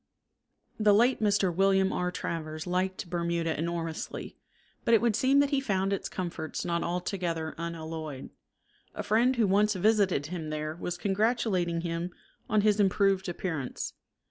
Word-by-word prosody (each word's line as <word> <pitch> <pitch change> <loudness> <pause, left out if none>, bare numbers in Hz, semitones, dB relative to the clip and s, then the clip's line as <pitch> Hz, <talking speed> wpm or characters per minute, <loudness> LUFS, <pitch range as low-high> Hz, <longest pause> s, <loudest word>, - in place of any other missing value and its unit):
The 210 -1 +5
late 240 +4 +3
Mr. 205 -4 +2
William 195 0 +3
R. 180 0 0
Travers 155 -2 -4
liked 185 +1 -1
Bermuda 170 -1 -1
enormously, 165 0 -4 0.5
but 230 - +5
it - - +8
would 230 -2 +2
seem 260 +4 +3
that 285 0 +1
he 275 -1 +2
found 195 -5 0
its 195 - -3
comforts 170 -3 -4
not 170 -1 0
altogether 175 -2 -2
unalloyed. 160 -4 -5 0.6
A - - -3
friend 240 +5 +3
who 235 -3 +3
once 205 +2 +3
visited 195 -6 +2
him 160 -1 -5
there 155 0 -3
was 175 +1 -4
congratulating 195 -4 +1
him 170 +1 -3 0.4
on 215 -1 +3
his 210 0 +3
improved 195 -1 +2
appearance. 160 -7 -4
180 Hz, 145 wpm, -29 LUFS, 165-205 Hz, 0.6 s, it